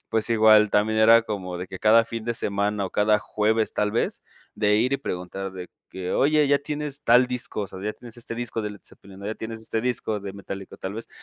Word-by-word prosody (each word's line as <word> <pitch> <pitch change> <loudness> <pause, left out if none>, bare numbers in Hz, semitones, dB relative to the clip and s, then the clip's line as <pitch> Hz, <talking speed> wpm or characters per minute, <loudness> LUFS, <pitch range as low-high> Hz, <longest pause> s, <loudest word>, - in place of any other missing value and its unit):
pues 110 +1 0
igual 110 -2 +6
también 110 +1 +2
era 115 +1 +7
como 95 -5 -5
de 90 - -5
que 95 - -8
cada 115 +2 +5
fin 115 0 -6
de 120 0 -2
semana 100 -1 -1
o - - -9
cada 105 0 +3
jueves 110 +2 0
tal 105 0 0
vez 115 - -1 0.3
de 105 -1 +2
ir 120 +5 +1
y 140 - +1
preguntar 95 -3 -5
de 90 -1 -8 0.2
que: 95 -1 -5
"Oye 150 +1 +3
¿ya 140 0 +3
tienes 150 0 -5
tal 125 +1 +5
disco, 125 -4 -3
o - - -4
sea 95 0 -10
ya 105 +1 -2
tienes 120 -1 -12
este 115 0 -6
disco 120 -1 -3
de 105 - -3
Led 105 - -13
Zepellin, 95 -1 -13
no? 100 - -7
¿Ya 110 - -3
tienes 110 0 -7
este 110 0 -2
disco 110 -3 -1
de 100 -1 -6
Metallica?, 100 0 -8
tal 95 - -5
vez, 115 +1 -7
110 Hz, 240 wpm, -24 LUFS, 100-115 Hz, 0.3 s, era